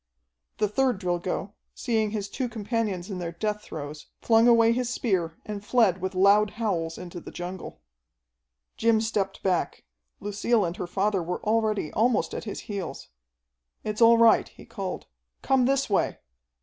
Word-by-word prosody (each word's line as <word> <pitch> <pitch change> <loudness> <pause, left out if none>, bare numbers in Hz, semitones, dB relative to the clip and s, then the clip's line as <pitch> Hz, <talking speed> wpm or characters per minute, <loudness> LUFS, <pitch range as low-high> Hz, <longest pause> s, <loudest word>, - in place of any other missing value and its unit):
The 210 - +2
third 250 +2 +1
Drilgo, 180 +2 -2 0.2
seeing 220 -4 0
his 205 -2 -3
two 250 +4 -3
companions 215 -4 -2
in 185 - -4
their 170 -1 -4
death 210 +4 -2
throes, 150 -4 -8
flung 225 0 +4
away 230 -1 +6
his 245 0 0
spear 185 -10 -1
and 205 -1 -6
fled 210 -5 +3
with 190 0 -3
loud 200 +3 +5
howls 170 -8 -1
into 175 -1 -7
the - - -10
jungle. 180 +1 -7 1.0
Jim 230 -1 +3
stepped 210 -3 -2
back. 185 -3 0 0.4
Lucille 205 +1 +1
and 170 0 -3
her 180 - -4
father 195 +1 0
were 175 +2 -4
already 215 -5 0
almost 230 +1 +1
at - - -5
his 205 - -5
heels. 200 -5 -6 0.7
"It's 215 +1 -3
all 230 0 +8
right," 230 -1 +5
he - - -15
called. - - -5 0.4
"Come 265 -2 +3
this 275 0 +1
way!" 200 - +1
210 Hz, 160 wpm, -26 LUFS, 185-230 Hz, 1.0 s, all